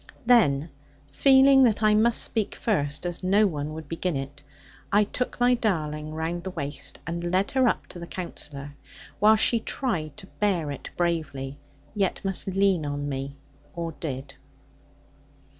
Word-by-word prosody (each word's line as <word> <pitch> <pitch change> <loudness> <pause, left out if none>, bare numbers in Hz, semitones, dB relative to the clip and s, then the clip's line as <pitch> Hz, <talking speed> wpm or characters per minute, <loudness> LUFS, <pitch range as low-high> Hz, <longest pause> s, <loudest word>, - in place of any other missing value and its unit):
Then 165 - +4 0.4
feeling 270 - +6
that 220 -2 +1
I 215 0 +5
must 225 +2 +4
speak 220 -3 -1
first 150 -8 -1
(as 175 -1 -4
no 195 +3 +4
one 150 -5 -2
would 160 0 -8
begin 165 0 -2
it), 135 +1 -6 0.5
I 205 +1 +5
took 250 +5 -4
my 245 +1 +4
darling 155 -9 -2
round 165 +2 -3
the 190 - -4
waist, 145 -5 -5
and 170 +1 -4
led 190 +2 +1
her 260 -1 +3
up - - 0
to 175 - -8
the 170 - -7
Counsellor; 145 -6 -7 0.5
while 215 +1 +6
she 230 +2 +3
tried 195 - -3
to 205 - -8
bear 190 -7 -1
it 140 - -7
bravely; 145 -5 -2 0.3
yet 200 -3 0
must 195 0 -1
lean 195 -3 +2
on 145 0 -3
me, 135 0 -4 0.4
or 170 -1 -3
did. 140 -2 -5
175 Hz, 160 wpm, -26 LUFS, 145-210 Hz, 0.5 s, feeling